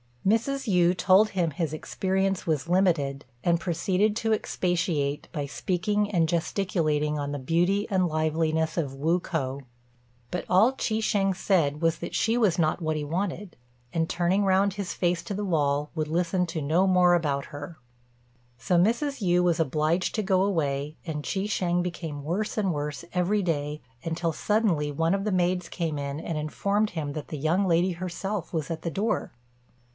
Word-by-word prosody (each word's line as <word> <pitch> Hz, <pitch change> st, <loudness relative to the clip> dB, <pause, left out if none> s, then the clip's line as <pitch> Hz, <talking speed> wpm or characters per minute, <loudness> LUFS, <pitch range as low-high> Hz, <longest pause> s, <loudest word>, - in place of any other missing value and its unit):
Mrs. 235 Hz, +4 st, +1 dB
Yü 180 Hz, -1 st, +4 dB
told 195 Hz, +4 st, +5 dB
him 180 Hz, -5 st, 0 dB
his 160 Hz, -1 st, -2 dB
experience 190 Hz, +4 st, -1 dB
was 155 Hz, -1 st, 0 dB
limited, 155 Hz, -7 st, +1 dB, 0.2 s
and 170 Hz, -1 st, +2 dB
proceeded 185 Hz, +4 st, +1 dB
to 225 Hz, -1 st, +1 dB
expatiate 170 Hz, -8 st, -1 dB
by 150 Hz, -4 st, -3 dB
speaking 205 Hz, +7 st, -1 dB
and 170 Hz, -5 st, +2 dB
gesticulating 160 Hz, -4 st, 0 dB
on 145 Hz, 0 st, -3 dB
the 145 Hz, -, -3 dB
beauty 175 Hz, +9 st, +1 dB
and 185 Hz, -3 st, +2 dB
liveliness 160 Hz, 0 st, 0 dB
of 140 Hz, -5 st, -1 dB
Wu 160 Hz, +6 st, +1 dB
k'o. 140 Hz, -6 st, -3 dB, 0.7 s
But 180 Hz, -, -3 dB
all 210 Hz, +7 st, +5 dB
Chi 220 Hz, -4 st, -1 dB
shêng 195 Hz, -3 st, +1 dB
said 165 Hz, -6 st, +1 dB
was 165 Hz, 0 st, +1 dB
that 170 Hz, -, -5 dB
she 225 Hz, +1 st, +2 dB
was 210 Hz, -8 st, +3 dB
not 160 Hz, +1 st, +1 dB
what 155 Hz, -1 st, 0 dB
he 150 Hz, -, -2 dB
wanted, 180 Hz, +4 st, -3 dB, 0.4 s
and, 165 Hz, -1 st, 0 dB
turning 180 Hz, +3 st, +1 dB
round 195 Hz, +1 st, +3 dB
his 200 Hz, -2 st, -4 dB
face 175 Hz, -1 st, 0 dB
to -, -, -5 dB
the 205 Hz, +1 st, -2 dB
wall, 145 Hz, -4 st, 0 dB
would 155 Hz, -2 st, -2 dB
listen 175 Hz, +3 st, 0 dB
to 165 Hz, -1 st, -4 dB
no 165 Hz, +7 st, +2 dB
more 180 Hz, -1 st, +5 dB
about 145 Hz, -5 st, 0 dB
her. 145 Hz, +3 st, -8 dB, 0.8 s
So 175 Hz, +9 st, +1 dB
Mrs. 235 Hz, -, +1 dB
Yü 175 Hz, 0 st, +4 dB
was 170 Hz, -2 st, +2 dB
obliged 155 Hz, +4 st, +1 dB
to 215 Hz, -, 0 dB
go 190 Hz, -1 st, +2 dB
away, 150 Hz, -6 st, -1 dB
and 150 Hz, -3 st, -4 dB
Chi 190 Hz, -, -2 dB
shêng 180 Hz, -4 st, 0 dB
became 165 Hz, -5 st, -5 dB
worse 185 Hz, +10 st, -2 dB
and 195 Hz, -4 st, +1 dB
worse 150 Hz, +2 st, -4 dB
every 185 Hz, +4 st, +1 dB
day, 150 Hz, -3 st, -2 dB, 0.2 s
until 165 Hz, 0 st, -1 dB
suddenly 190 Hz, -10 st, +1 dB
one 165 Hz, +4 st, +1 dB
of 195 Hz, +1 st, -1 dB
the 210 Hz, -, 0 dB
maids 180 Hz, -1 st, +1 dB
came 160 Hz, -4 st, -2 dB
in 140 Hz, +1 st, -4 dB
and 160 Hz, -1 st, -3 dB
informed 200 Hz, +7 st, 0 dB
him 150 Hz, -4 st, -4 dB
that 150 Hz, -1 st, -6 dB
the 155 Hz, -, -5 dB
young 170 Hz, +7 st, +1 dB
lady 175 Hz, +2 st, +2 dB
herself 185 Hz, +2 st, -4 dB
was 155 Hz, -5 st, -2 dB
at 160 Hz, -1 st, -4 dB
the 170 Hz, -, -3 dB
door. 215 Hz, +5 st, -1 dB
175 Hz, 180 wpm, -27 LUFS, 155-190 Hz, 0.8 s, told